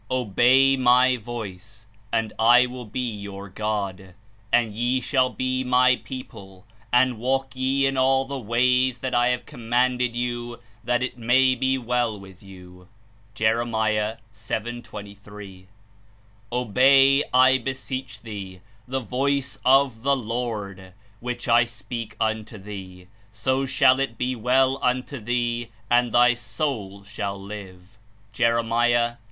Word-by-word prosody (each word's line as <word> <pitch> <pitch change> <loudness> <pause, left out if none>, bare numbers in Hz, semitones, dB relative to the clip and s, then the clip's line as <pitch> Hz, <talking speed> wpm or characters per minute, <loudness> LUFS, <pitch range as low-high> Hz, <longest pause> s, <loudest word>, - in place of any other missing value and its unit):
''Obey 130 +3 +3
my 125 0 +5
voice, 110 -3 -8 0.3
and 110 -2 -1
I 120 +3 +6
will 125 -2 -8
be 125 +4 -3
your 100 -2 -7
God, 95 -3 -4 0.4
and 115 -3 +2
ye 120 +4 0
shall 130 0 +1
be 130 0 -2
my 125 0 +4
people; 100 -7 -10 0.3
and 125 -2 +3
walk 135 +2 -1
ye 135 +1 +1
in 135 0 0
all 135 +1 +3
the 135 0 -5
ways 125 +2 +2
that 130 -1 -4
I 120 0 +3
have 125 0 -1
commanded 125 -1 0
you, 120 -1 -4 0.2
that 125 0 0
it 125 -1 -5
may 130 +3 +4
be 130 +1 0
well 120 -3 -1
with 95 -1 -14
you. 90 -2 -14 0.5
(Jer. 110 -1 0
7. 115 +2 -5
23.) 100 -3 -11 0.8
"Obey, 135 +4 +4
I 130 +1 +5
beseech 130 -2 -5
thee, 100 -5 -8 0.3
the 130 +1 -2
voice 135 +2 -2
of 130 -3 +3
the 140 +2 +2
Lord, 105 -6 -5 0.3
which 125 0 -5
I 115 0 +5
speak 115 -1 -7
unto 110 0 -2
thee; 95 -3 -10 0.3
so 130 +5 -1
shall 130 0 +4
it 135 -5 -2
be 125 +1 -1
well 130 +3 +2
unto 130 +2 -1
thee, 120 +1 -2 0.2
and 120 -1 +3
thy 120 +1 +5
soul 115 -4 -4
shall 100 -1 -5
live/' 100 0 -11 0.3
(Jer. 115 +2 +2
38. 120 +1 +1
120 Hz, 135 wpm, -24 LUFS, 110-130 Hz, 0.8 s, I